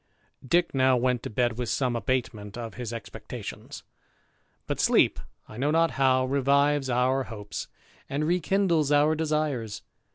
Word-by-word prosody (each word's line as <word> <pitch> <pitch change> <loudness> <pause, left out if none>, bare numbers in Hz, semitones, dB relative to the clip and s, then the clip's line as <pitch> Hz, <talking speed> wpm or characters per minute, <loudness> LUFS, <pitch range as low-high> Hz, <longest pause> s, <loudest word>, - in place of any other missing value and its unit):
Dick 170 +6 +1
now 130 -1 +4
went 125 0 +1
to - - -5
bed 120 +1 0
with 120 -3 -2
some 125 +4 0
abatement 115 -4 -2
of 115 -2 -6
his 120 -3 -6
expectations; 115 -1 -8 0.8
but - - -3
sleep, - - +3 0.3
I 110 - -11
know 140 +4 0
not 165 +1 +3
how, 130 -1 +2
revives 140 +1 +2
our 130 +2 +1
hopes, 105 -3 -7 0.4
and 145 +2 -1
rekindles 175 -2 +1
our 145 +2 +4
desires. 150 -8 -2
130 Hz, 140 wpm, -27 LUFS, 120-150 Hz, 0.8 s, now